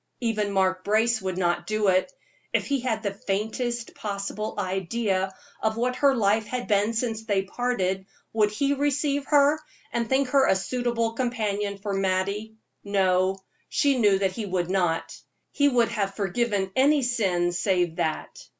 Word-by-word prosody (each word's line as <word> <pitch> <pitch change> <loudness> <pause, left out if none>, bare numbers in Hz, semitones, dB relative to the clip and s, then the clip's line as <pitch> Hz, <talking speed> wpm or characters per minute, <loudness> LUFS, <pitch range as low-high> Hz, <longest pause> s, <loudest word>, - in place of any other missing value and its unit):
Even 215 -4 0
Mark 185 -1 +1
Brace 220 +2 +2
would 185 -1 -3
not 175 -1 0
do 215 -2 +1
it. 185 0 +2 0.4
If - - +1
he 280 -1 0
had 235 -3 -2
the 200 -2 -1
faintest 220 +4 -3
possible 205 +1 -4
idea 190 0 -1 0.3
of 220 0 0
what 250 +2 0
her 280 -2 +4
life 215 -1 +2
had 250 +2 -4
been 210 +1 +2
since 225 -1 -2
they 200 -3 +1
parted, 195 -4 -1 0.3
would 215 -2 +3
he 275 +7 0
receive 285 0 0
her, 290 +1 +4 0.3
and 235 -1 -1
think 265 0 +2
her 275 0 +4
a - - +4
suitable 235 +2 -1
companion 210 -5 -2
for 200 0 -4
Mattie? 195 +3 -1 0.3
No; 190 -1 +2 0.3
she 280 -3 +2
knew 205 -4 +4
that 190 -1 +1
he 210 +2 -5
would 180 -1 -1
not; 175 -4 0 0.4
he 285 -1 +3
would 240 -3 +3
have 200 -4 -2
forgiven 200 0 -1
any 280 +2 +4
sin 190 -8 +1
save 175 -1 0
that. 155 -1 -2
210 Hz, 160 wpm, -26 LUFS, 190-240 Hz, 0.4 s, her